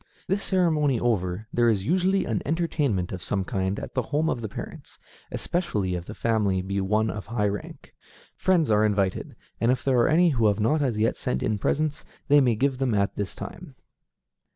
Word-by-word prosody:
This 195 Hz, +2 st, -1 dB
ceremony 155 Hz, -, +2 dB
over, 105 Hz, -4 st, -1 dB
there 120 Hz, -1 st, +3 dB
is 100 Hz, -4 st, 0 dB
usually 185 Hz, -, +2 dB
an 110 Hz, -3 st, -1 dB
entertainment 145 Hz, -, 0 dB
of 95 Hz, -, -5 dB
some 95 Hz, +2 st, -1 dB
kind 95 Hz, +1 st, -2 dB
at -, -, -8 dB
the 130 Hz, -, +1 dB
home 150 Hz, +6 st, 0 dB
of 120 Hz, -, -3 dB
the 110 Hz, -, -4 dB
parents, -, -, -9 dB, 0.3 s
especially 105 Hz, -, -1 dB
if 90 Hz, -1 st, -4 dB
the 105 Hz, -, -8 dB
family 105 Hz, -5 st, +1 dB
be 100 Hz, +1 st, -2 dB
one 105 Hz, +3 st, +1 dB
of 105 Hz, -, -7 dB
high 110 Hz, -3 st, 0 dB
rank. 100 Hz, -1 st, -6 dB, 0.4 s
Friends 170 Hz, -9 st, +2 dB
are 105 Hz, 0 st, +4 dB
invited, 100 Hz, -3 st, 0 dB, 0.2 s
and 115 Hz, +2 st, +3 dB
if 130 Hz, -1 st, -1 dB
there 130 Hz, -3 st, +2 dB
are 120 Hz, -, +4 dB
any 170 Hz, +3 st, +5 dB
who 115 Hz, -7 st, +2 dB
have 100 Hz, 0 st, +1 dB
not 150 Hz, +9 st, +2 dB
as 125 Hz, -6 st, 0 dB
yet 110 Hz, +2 st, +1 dB
sent 65 Hz, +1 st, -2 dB
in 105 Hz, -1 st, 0 dB
presents, 150 Hz, +7 st, -1 dB, 0.3 s
they 145 Hz, 0 st, +7 dB
may 125 Hz, -4 st, +3 dB
give 130 Hz, +3 st, 0 dB
them 130 Hz, -5 st, +1 dB
at 100 Hz, 0 st, 0 dB
this 100 Hz, -3 st, -4 dB
time. 170 Hz, -6 st, -9 dB
115 Hz, 200 wpm, -25 LUFS, 100-145 Hz, 0.4 s, they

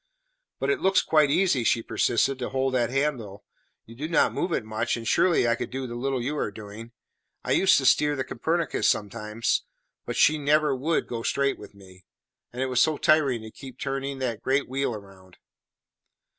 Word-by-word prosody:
"But -, -, 0 dB
it 400 Hz, -, 0 dB
looks 190 Hz, 0 st, +3 dB
quite 155 Hz, -2 st, +3 dB
easy," 165 Hz, -5 st, +2 dB
she 115 Hz, 0 st, +1 dB
persisted, 130 Hz, +5 st, 0 dB
"to 125 Hz, -, -3 dB
hold 135 Hz, 0 st, -1 dB
that 120 Hz, -3 st, +1 dB
handle. 125 Hz, -7 st, -2 dB, 0.4 s
You 115 Hz, -, -13 dB
do 145 Hz, +7 st, -5 dB
not 165 Hz, -, +2 dB
move 175 Hz, -, -2 dB
it 115 Hz, -, -1 dB
much, 110 Hz, +2 st, -2 dB
and 115 Hz, -1 st, -7 dB
surely 170 Hz, -6 st, +3 dB
I 115 Hz, -, +3 dB
could -, -, -4 dB
do 135 Hz, 0 st, -4 dB
the 120 Hz, -, -7 dB
little 130 Hz, +1 st, -2 dB
you 145 Hz, +4 st, -2 dB
are -, -, -1 dB
doing. 110 Hz, +2 st, -10 dB, 0.5 s
I -, -, -3 dB
used 190 Hz, -, +5 dB
to 135 Hz, -, -1 dB
steer 150 Hz, +3 st, +4 dB
the 135 Hz, -, -2 dB
Copernicus 165 Hz, +4 st, -1 dB
sometimes, 105 Hz, +2 st, -1 dB, 0.5 s
but -, -, -3 dB
she 155 Hz, 0 st, +4 dB
never 150 Hz, 0 st, +2 dB
would 155 Hz, +6 st, 0 dB
go 115 Hz, -1 st, -4 dB
straight 140 Hz, +3 st, 0 dB
with -, -, -13 dB
me; 95 Hz, -1 st, -17 dB, 0.5 s
and 125 Hz, +2 st, -3 dB
it -, -, -1 dB
was 125 Hz, -1 st, +1 dB
so 155 Hz, -2 st, +2 dB
tiring 140 Hz, -7 st, +2 dB
to 110 Hz, -, -9 dB
keep 130 Hz, -1 st, -12 dB
turning 135 Hz, 0 st, -3 dB
that 125 Hz, -5 st, -3 dB
great 135 Hz, +2 st, 0 dB
wheel 130 Hz, -2 st, -2 dB
round." 95 Hz, -3 st, -14 dB
130 Hz, 200 wpm, -26 LUFS, 115-145 Hz, 0.5 s, used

